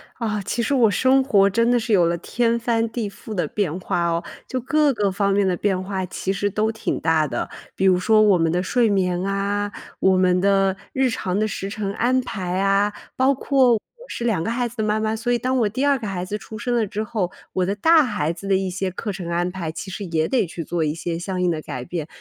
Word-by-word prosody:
啊， 215 -3 -2
其 235 +5 -2
实 285 - 0
我 235 -5 +5
生 260 +6 +3
活 200 -7 +4
真 230 +4 +2
的 245 - +3
是 225 -1 -1
有 180 -4 +5
了 170 +1 0
天 235 +6 0
翻 230 -1 0
地 220 -2 -3
覆 215 +2 -9
的 175 -6 -1
变 180 -2 -2
化 175 -1 -1
哦。 170 0 -1 0.2
就 255 - -2
各 295 +4 +2
个 205 -4 0
方 200 +1 +1
面 200 -1 +2
的 180 - +1
变 190 0 0
化 190 -1 -3
其 190 +1 -3
实 205 +1 -1
都 215 +3 0
挺 220 - -3
大 160 -2 +2
的， 120 -3 -3 0.3
比 195 - 0
如 185 -1 +5
说 215 +3 +4
我 205 -3 +5
们 165 -1 +1
的 180 +1 0
睡 235 +4 +2
眠 180 -3 +1
啊， 200 +1 -1 0.3
我 190 -1 +4
们 180 -1 +3
的 195 -1 +3 0.2
日 265 -1 +2
常 190 -5 -2
的 215 - +1
时 195 -1 -4
程 200 -1 -3
安 250 +4 +2
排 185 -7 -3
啊， 195 +1 +2 0.2
包 265 +1 +3
括 265 -2 +3
我 225 - +1 0.3
是 235 - -5
2 220 -8 +1
个 - - -2
孩 240 +1 0
子 235 - -12
的 220 - 0
妈 215 0 +1
妈， 220 0 0
所 235 +2 -2
以 240 - +3
当 255 +2 -1
我 215 -3 +2
第 260 +7 -1
2 280 -2 +3
个 220 - -5
孩 180 -2 -3
子 205 +3 -3
出 215 +1 -9
生 240 +3 -1
了 225 -3 +1
之 210 +2 -3
后， 205 -5 -2 0.2
我 185 - +1
的 195 +2 -1
大 320 +9 +5
孩 205 - -1
子 190 +4 -9
的 195 - +3
一 190 0 0
些 185 +1 -2
课 205 +3 -4
程 180 -2 -6
安 175 +1 0
排， 175 -4 -4
其 190 +4 -7
实 195 - -5
也 160 -2 0
得 245 -9 +1
去 165 0 -6
做 170 +1 -1
一 150 0 -1
些 165 0 -3
相 185 +1 -3
应 180 -1 +2
的 155 -2 -3
改 130 -5 -6
变。 165 -1 -4
200 Hz, 275 characters per minute, -22 LUFS, 180-230 Hz, 0.3 s, 我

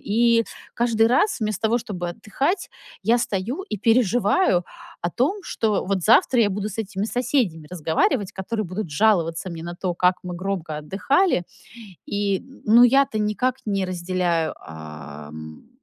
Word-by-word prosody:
И 230 +2 +3 0.3
каждый 225 -1 +3
раз, 260 - +2
вместо 215 -3 -2
того 235 +2 +2
чтобы 180 -6 -5
отдыхать, 275 - -2 0.3
я 230 +5 +3
стою 230 - -2
и 215 - -2
переживаю 225 - +3 0.4
о 175 - 0
том, 305 - 0
что 220 - -1
вот 190 -1 -1
завтра 235 +2 +5
я 210 -3 +3
буду 205 +2 -2
с 195 - -8
этими 205 -2 -2
соседями 225 - 0
разговаривать, 180 - 0
которые 215 +3 -3
будут 185 0 -5
жаловаться 170 -1 +1
мне 165 -1 -7
на 175 +1 -6
то, 175 0 -3
как 180 +1 +3
мы 180 -1 -5
громко 180 -4 -3
отдыхали. 205 - +1 0.6
И 200 -1 0
н 270 - -17
ну, 230 +3 +7
я-то 270 -1 +3
никак 215 +5 0
не 195 -2 0
разделяю, 175 -2 -1 0.2
эм, 75 0 -10
200 Hz, 150 wpm, -23 LUFS, 175-235 Hz, 0.6 s, ну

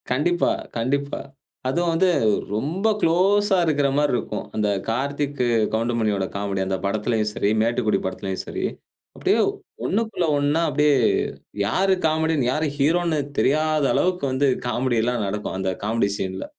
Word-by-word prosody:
கண்டிப்பா, 160 +7 +2 0.3
கண்டிப்பா. 140 +4 -1 0.5
அதுவும் 170 +5 +1
வந்து 185 +3 +3 0.4
ரொம்ப 160 - -1
குளோஸ்ஸா 195 +4 +3
இருக்கிற 145 -3 +2
மாரி 145 -2 +2
இருக்கும். - - -3
அந்த 105 -1 +1 0.2
கார்த்திக், 140 +3 -2 0.3
கவுண்டமணியோட 110 -3 0
காமெடி 100 -1 -2
அந்த 95 0 -1
படத்திலேயும் 105 +1 0
சரி 100 - 0
"மேட்டுக்குடி" 115 -3 +1
படத்திலயும் 95 0 -4
சரி, - - -4 0.5
அப்படியே - - +1 0.5
ஒண்ணுக்குள்ள 220 -4 0
ஒண்ணா 145 +3 +1
அப்படியே 150 0 +3 0.7
யாரு 190 - +2
காமெடியன், 160 -3 +1
யாரு 155 +3 0
ஹீரோன்னு 160 +2 +2 0.2
தெரியாதளவுக்கு 155 +3 +2
வந்து 135 +2 +2 0.2
காமெடில்லாம் 120 -2 0
நடக்கும். 105 0 -4
அந்த 95 0 -1
காமெடி 110 -1 +1
சீன்ல. 95 0 -4
140 Hz, 125 wpm, -23 LUFS, 110-160 Hz, 0.7 s, வந்து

